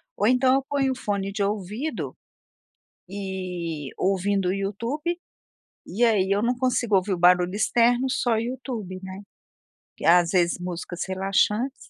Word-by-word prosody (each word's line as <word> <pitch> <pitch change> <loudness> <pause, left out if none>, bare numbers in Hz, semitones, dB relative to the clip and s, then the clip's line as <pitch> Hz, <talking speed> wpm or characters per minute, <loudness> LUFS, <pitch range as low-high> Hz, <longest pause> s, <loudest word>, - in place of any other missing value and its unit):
Ou 205 - +1
então, 255 +1 +4
eu 270 - +1
ponho 275 -2 +1
o - - -9
fone 200 -4 -2
de 200 0 -1
ouvido 210 - -3 0.9
e 180 -6 -5
ouvindo 195 0 +1
o 185 - +1
YouTube. 230 - -3 0.7
E 235 +6 -1
aí, 200 -5 +2
eu 200 - +2
não 240 +3 +1
consigo 245 -4 +1
ouvir 190 +1 +1
o 180 - -2
barulho 180 +1 +4
externo, 240 +4 +2
só 245 -2 0
o 220 - +2
YouTube, 230 -5 -4
né. 190 +1 -7 0.8
Às 175 0 +5
vezes, 175 -2 +2
músicas 175 0 -6
relaxantes. 200 +7 0
200 Hz, 145 wpm, -25 LUFS, 185-240 Hz, 0.9 s, Às